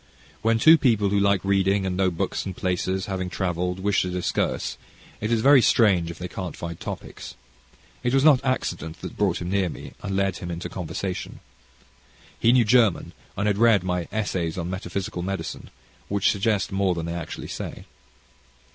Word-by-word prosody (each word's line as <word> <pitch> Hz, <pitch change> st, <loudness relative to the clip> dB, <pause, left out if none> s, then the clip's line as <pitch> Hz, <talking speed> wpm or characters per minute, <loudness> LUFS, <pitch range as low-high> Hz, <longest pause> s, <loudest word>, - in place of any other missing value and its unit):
When 115 Hz, +1 st, +2 dB
two 160 Hz, +8 st, +7 dB
people, 110 Hz, -6 st, +3 dB
who 100 Hz, 0 st, +2 dB
like 100 Hz, -1 st, +2 dB
reading, 95 Hz, 0 st, +2 dB
and 95 Hz, -1 st, -1 dB
know 95 Hz, 0 st, +2 dB
books 85 Hz, -, -2 dB
and 95 Hz, -2 st, -6 dB
places, 95 Hz, +1 st, -1 dB
having 95 Hz, -3 st, -3 dB
travelled, 90 Hz, 0 st, -2 dB
wish 100 Hz, 0 st, +2 dB
to 90 Hz, -, -2 dB
discourse, 90 Hz, 0 st, -1 dB, 0.4 s
it 110 Hz, +2 st, -2 dB
is 115 Hz, -2 st, +2 dB
very 140 Hz, +1 st, +7 dB
strange 95 Hz, -9 st, +3 dB
if 85 Hz, -, -7 dB
they 90 Hz, -, -5 dB
can't 90 Hz, -2 st, -6 dB
find 85 Hz, -1 st, -6 dB
topics. -, -, -7 dB, 0.7 s
It 120 Hz, -, 0 dB
was 135 Hz, +1 st, +3 dB
not 145 Hz, -4 st, +6 dB
accident 85 Hz, -, -2 dB
that 90 Hz, -, -6 dB
brought 95 Hz, -4 st, 0 dB
him 90 Hz, -, -4 dB
near 95 Hz, -2 st, +1 dB
me, -, -, -9 dB
and 100 Hz, -1 st, -3 dB
led 95 Hz, -2 st, 0 dB
him 90 Hz, -, -6 dB
into 85 Hz, 0 st, -5 dB
conversation. 90 Hz, +1 st, -5 dB, 1.0 s
He 115 Hz, -, +4 dB
knew 125 Hz, -2 st, +4 dB
German 115 Hz, -4 st, +3 dB, 0.2 s
and 100 Hz, -, 0 dB
had 105 Hz, -1 st, +1 dB
read 115 Hz, -5 st, +5 dB
my 90 Hz, -2 st, -2 dB
Essays 95 Hz, -6 st, -2 dB
on 85 Hz, 0 st, -3 dB
Metaphysical 95 Hz, -1 st, -4 dB
Medicine 95 Hz, +2 st, -5 dB, 0.4 s
which 100 Hz, -1 st, +2 dB
suggest 100 Hz, -3 st, 0 dB
more 95 Hz, -2 st, +1 dB
than 85 Hz, -1 st, -3 dB
they 85 Hz, -, -3 dB
actually 85 Hz, -2 st, -6 dB
say. -, -, -6 dB
95 Hz, 180 wpm, -24 LUFS, 90-105 Hz, 1.0 s, two